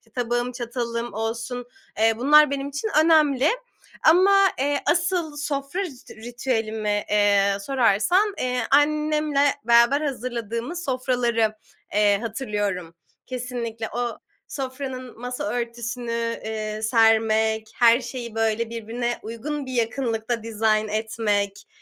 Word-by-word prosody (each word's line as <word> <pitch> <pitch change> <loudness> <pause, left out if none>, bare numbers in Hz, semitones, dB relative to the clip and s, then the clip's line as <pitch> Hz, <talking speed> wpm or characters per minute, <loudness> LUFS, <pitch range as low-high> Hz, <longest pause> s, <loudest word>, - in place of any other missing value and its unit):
tabağım, 240 0 -1
çatalım 235 -1 -4
olsun, 235 +3 -4 0.3
eee, 225 +1 +4
bunlar 295 +3 +6
benim 275 0 -2
için 285 +10 -3 0.2
önemli. 315 -2 +5 0.8
Ama, 390 +4 +6
eee, 285 +1 +1
asıl 345 -3 0
sofra 280 +3 -3
rit 295 -10 -8
ritüelimi, 220 -3 -2
eee, 200 -1 +3
sorarsan, 270 - +2
eee, 250 0 -1
annemle 300 0 +2 0.2
beraber 235 +5 +5
hazırladığımız 250 +3 -4
sofraları 245 -4 0 0.4
eee, 205 -1 +3
hatırlıyorum. 205 -7 -3 0.3
Kesinlikle 235 -3 -5
o 240 -1 -2 0.3
sofranın 260 -2 -6
masa 250 +3 -5
örtüsünü, 235 0 -4 0.3
eee, 215 -1 -4
sermek, 220 -1 +2
her 235 +1 +5
şeyi 235 -2 -7
böyle, 225 0 0
birbirine 235 +1 -3
uygun 270 +6 -5
bir 260 - -6
yakınlıkta 230 -1 -1
dizayn 215 -1 +1
etmek, 210 -2 -2
240 Hz, 105 wpm, -24 LUFS, 220-270 Hz, 0.8 s, bunlar